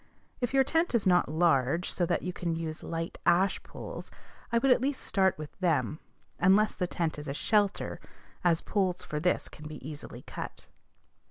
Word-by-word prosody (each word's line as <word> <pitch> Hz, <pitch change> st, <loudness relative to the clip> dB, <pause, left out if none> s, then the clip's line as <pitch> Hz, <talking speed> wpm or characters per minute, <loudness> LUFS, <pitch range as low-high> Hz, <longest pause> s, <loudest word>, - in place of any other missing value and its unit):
If 245 Hz, -2 st, -1 dB
your 270 Hz, 0 st, +5 dB
tent 325 Hz, +1 st, +1 dB
is 225 Hz, -, +2 dB
not 180 Hz, -5 st, +4 dB
large, 160 Hz, 0 st, +2 dB
so 175 Hz, -, 0 dB
that -, -, 0 dB
you 180 Hz, -, -3 dB
can 170 Hz, -2 st, -2 dB
use 160 Hz, -1 st, -4 dB
light 165 Hz, 0 st, -4 dB
ash 185 Hz, +3 st, +3 dB
poles, -, -, -8 dB, 0.4 s
I 235 Hz, -, +3 dB
would 270 Hz, +3 st, +3 dB
at 250 Hz, -, +5 dB
least 270 Hz, 0 st, -1 dB
start 190 Hz, -2 st, +2 dB
with 155 Hz, -1 st, -7 dB
them, 165 Hz, -3 st, +1 dB, 0.4 s
unless 195 Hz, +4 st, +5 dB
the 180 Hz, -, -1 dB
tent 165 Hz, -3 st, -2 dB
is 150 Hz, -, -7 dB
a 140 Hz, -, -3 dB
"shelter," 205 Hz, +3 st, +1 dB, 0.4 s
as 170 Hz, -2 st, +3 dB
poles 185 Hz, -3 st, 0 dB
for 150 Hz, -, -3 dB
this 180 Hz, +3 st, +1 dB
can 150 Hz, -, -10 dB
be 155 Hz, -, -7 dB
easily 150 Hz, -1 st, -8 dB
cut. -, -, -7 dB
175 Hz, 185 wpm, -30 LUFS, 160-200 Hz, 0.4 s, your